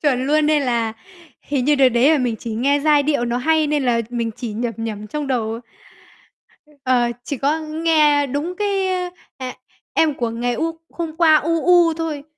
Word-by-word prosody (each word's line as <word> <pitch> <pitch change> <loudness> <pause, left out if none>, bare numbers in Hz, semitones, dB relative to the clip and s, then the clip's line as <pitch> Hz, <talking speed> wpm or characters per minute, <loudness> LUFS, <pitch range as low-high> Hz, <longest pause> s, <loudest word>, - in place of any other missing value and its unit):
Chuẩn 260 -3 +1
luôn, 300 +1 +2
nên 300 -2 +2
là 235 -3 0 0.5
hình 275 -3 -2
như 295 +2 +4
đợt 270 -2 +5
đấy 250 +4 +3
là 310 - +3
mình 245 -4 -1
chỉ 225 +1 -6
nghe 280 +5 +1
giai 295 -1 +4
điệu 285 -4 0
nó 240 0 -1
hay 315 +4 +2
nên 295 -2 0
là 235 -2 +2
mình 235 -2 -2
chỉ 235 -4 -5
nhẩm 230 +2 -3
nhẩm 215 -2 -5
trong 295 +6 -4
đầu. 230 -3 -2 1.2
Ờ, 250 -2 +2 0.2
chỉ 270 +3 -4
có 290 +5 0
nghe 310 -2 +2
đúng 290 +7 -3
cái, 400 -2 0
ơ, 365 -1 -2 0.3
ờ: 260 - -5 0.5
"Em 315 -2 +2
của 235 -3 -2
ngày 240 +2 -2
u 325 +6 -3
hôm 330 -2 -5
qua, 320 -2 +5
u, 330 +2 +1
u" 350 -2 +5
thôi. 315 -3 -4
285 Hz, 200 wpm, -20 LUFS, 240-315 Hz, 1.2 s, đợt